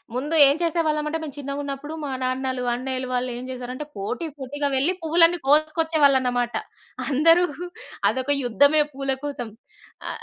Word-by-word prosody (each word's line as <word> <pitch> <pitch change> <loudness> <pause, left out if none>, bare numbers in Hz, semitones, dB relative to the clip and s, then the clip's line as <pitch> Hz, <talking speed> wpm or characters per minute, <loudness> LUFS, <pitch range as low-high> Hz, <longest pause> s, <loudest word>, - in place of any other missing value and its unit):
ముందు 290 +6 -2
ఏం 280 +1 +4
చేసేవాళ్ళమంటే, 315 -2 0
మేము 290 -4 -7
చిన్నగున్నప్పుడు 280 +1 -5
మా 285 - -3
నాన్నలు, 255 0 -1
అన్నయ్యలు 255 +1 -3
వాళ్ళేం 250 -1 -2
జేశారంటే, 255 +2 -6
పోటీ 225 - -3
పోటీగా 285 +2 -3
వెళ్లి, 280 +8 +2
పువ్వులన్నీ 335 +2 +4
కోసుకొచ్చేవాళ్ళన్నమాట. 285 -6 +3 0.6
అందరూ 330 +5 +5 0.7
అదొక 260 +5 -1
యుద్ధమే 285 +6 +4
పూల 275 0 -2
కోసం. 260 -5 -4 0.6
ఆ! - - -2
280 Hz, 125 wpm, -24 LUFS, 255-305 Hz, 0.7 s, అందరూ